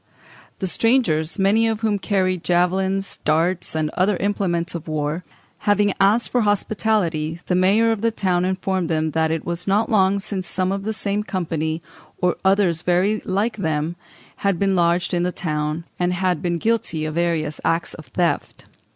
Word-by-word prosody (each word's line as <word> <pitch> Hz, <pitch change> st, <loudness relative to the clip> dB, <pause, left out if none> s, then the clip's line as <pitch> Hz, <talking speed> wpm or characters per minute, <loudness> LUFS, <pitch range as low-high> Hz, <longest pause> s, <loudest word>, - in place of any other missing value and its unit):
The 190 Hz, -, -3 dB
strangers, 185 Hz, -7 st, +1 dB
many 210 Hz, +4 st, +3 dB
of 220 Hz, -1 st, -1 dB
whom 210 Hz, -3 st, +1 dB
carried 185 Hz, -3 st, 0 dB
"javelins, 190 Hz, +2 st, +1 dB
darts, 165 Hz, +3 st, +1 dB
and 155 Hz, -1 st, 0 dB
other 185 Hz, +1 st, +1 dB
implements 180 Hz, -4 st, -1 dB
of 170 Hz, -2 st, -6 dB
war," 155 Hz, +2 st, -2 dB, 0.4 s
having 205 Hz, -1 st, +2 dB
asked 210 Hz, +4 st, +3 dB
for 245 Hz, -, +2 dB
hospitality, 200 Hz, -6 st, 0 dB
the -, -, -1 dB
mayor 200 Hz, +5 st, +4 dB
of 220 Hz, -3 st, -2 dB
the 230 Hz, -, +3 dB
town 185 Hz, -5 st, 0 dB
informed 185 Hz, -1 st, -1 dB
them 160 Hz, -1 st, 0 dB
"that 160 Hz, +1 st, +1 dB
it 160 Hz, -1 st, -2 dB
was 170 Hz, +2 st, -3 dB
not 210 Hz, +4 st, +2 dB
long 195 Hz, -2 st, +4 dB
since 195 Hz, -2 st, -4 dB
some 185 Hz, 0 st, -1 dB
of 195 Hz, 0 st, -3 dB
the 220 Hz, -, -1 dB
same 205 Hz, -1 st, -1 dB
company, 165 Hz, -5 st, -3 dB, 0.4 s
or 180 Hz, -1 st, +2 dB
others 190 Hz, -4 st, +3 dB
very 185 Hz, +5 st, +1 dB
like 205 Hz, +4 st, 0 dB
them, 160 Hz, -2 st, -1 dB, 0.4 s
had 200 Hz, -3 st, 0 dB
been 195 Hz, +1 st, +1 dB
lodged 170 Hz, 0 st, +1 dB
in 175 Hz, -, +1 dB
the 180 Hz, +1 st, 0 dB
town, 155 Hz, -2 st, -3 dB
and 180 Hz, 0 st, +1 dB
had 180 Hz, -3 st, 0 dB
been 175 Hz, -1 st, -1 dB
guilty 170 Hz, -6 st, 0 dB
of 155 Hz, -, -3 dB
various 165 Hz, -3 st, -1 dB
acts 165 Hz, +1 st, 0 dB
of 155 Hz, -5 st, -11 dB
theft." 170 Hz, +4 st, -1 dB
180 Hz, 175 wpm, -22 LUFS, 165-200 Hz, 0.4 s, mayor